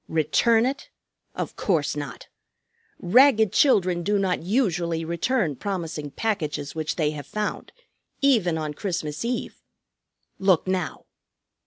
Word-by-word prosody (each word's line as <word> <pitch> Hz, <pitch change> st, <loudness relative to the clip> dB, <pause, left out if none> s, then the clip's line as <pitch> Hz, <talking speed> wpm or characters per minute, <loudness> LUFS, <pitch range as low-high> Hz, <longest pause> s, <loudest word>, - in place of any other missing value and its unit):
"Return 220 Hz, -, +3 dB
it? 270 Hz, +2 st, -3 dB, 0.5 s
Of -, -, -4 dB
course 160 Hz, -8 st, 0 dB
not! 145 Hz, -4 st, -6 dB, 0.7 s
Ragged 220 Hz, +1 st, +4 dB
children 185 Hz, -10 st, +3 dB
do 205 Hz, +4 st, +1 dB
not 190 Hz, -2 st, 0 dB
usually 170 Hz, -5 st, 0 dB
return 170 Hz, -, 0 dB
promising 165 Hz, -5 st, -4 dB
packages 150 Hz, -6 st, -2 dB
which 155 Hz, -1 st, -3 dB
they 150 Hz, -3 st, +1 dB
have 145 Hz, -2 st, -8 dB
found, 210 Hz, +5 st, -4 dB, 0.5 s
even 220 Hz, -12 st, +3 dB
on 155 Hz, -1 st, -3 dB
Christmas 155 Hz, -3 st, -3 dB
Eve. 240 Hz, +1 st, -3 dB, 0.8 s
Look 190 Hz, -4 st, +3 dB
now!" 185 Hz, -3 st, -2 dB
180 Hz, 120 wpm, -24 LUFS, 155-215 Hz, 0.8 s, Ragged